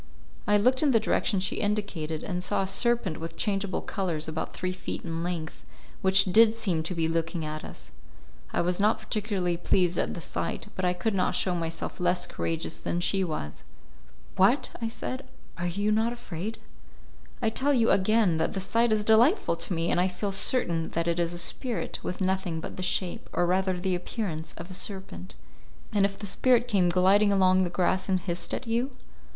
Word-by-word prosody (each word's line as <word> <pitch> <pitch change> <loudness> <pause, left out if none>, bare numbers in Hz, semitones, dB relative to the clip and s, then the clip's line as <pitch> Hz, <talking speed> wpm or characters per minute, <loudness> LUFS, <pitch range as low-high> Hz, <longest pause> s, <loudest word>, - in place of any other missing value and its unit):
I 210 - +5
looked 255 +5 +3
in 300 - +3
the 235 -4 +4
direction 210 -2 +1
she 185 0 -1
indicated, 195 -7 -2
and 180 -2 -3
saw 195 - 0
a - - -3
serpent 205 -3 +1
with 165 0 -7
changeable 195 -2 -1
colours 170 -6 -2
about 160 0 -4
three 185 0 -2
feet 185 - -6
in 165 -1 -3
length, 170 -2 -4 0.4
which 190 0 +6
did 220 +4 +5
seem 190 -8 0
to 165 +3 -4
be 165 -1 +1
looking 165 0 -1
at 155 0 -5
us. - - -10 0.6
I - - +1
was 180 +2 0
not 210 +2 +3
particularly 205 -5 -1
pleased 175 0 +2
at - - -1
the - - -5
sight, 165 - -4
but 185 - -1
I 180 - +2
could 200 +5 -1
not 185 -2 +1
show 185 - +1
myself 165 -1 -4
less 180 0 +2
courageous 165 0 -3
than 175 - -1
she 190 +2 +1
was. 155 - -5 0.7
"What!" - - +3 0.2
said 255 +3 -5 0.3
I, 175 - -3
"are - - 0
you 205 +4 0
not 220 +2 +2
afraid?" 220 -3 -6 0.8
"I 220 - +1
tell 275 +5 +1
you, 235 -4 +3
again, 200 -3 +3
that 160 - 0
the 195 - -2
sight 230 +4 +1
is 215 -1 +2
delightful 225 - +4
to 170 +3 -4
me, 165 +1 0
and 175 - +3
I 185 - +3
feel 195 +2 -3
certain 175 -5 +1
that 170 0 0
it 170 0 0
is 170 -1 0
a 175 - -5
spirit 235 +7 -3
with 180 - -5
nothing 185 -3 0
but - - -7
the - - -6
shape, 185 0 -2
or 175 - +2
rather 185 +1 +1
the 185 +1 0
appearance, 175 -3 -4
of 180 - -8
a - - -6
serpent." 185 - -4 0.6
"And 200 -2 +4
if 195 0 -3
the 210 - -6
spirit 245 +4 +2
came 195 -6 +3
gliding 190 +4 +4
along 185 -1 +4
the - - -2
grass 185 +2 0
and 185 -1 +2
hissed 175 -1 -4
at - - -6
you?" 235 +3 0
185 Hz, 200 wpm, -27 LUFS, 170-210 Hz, 0.8 s, which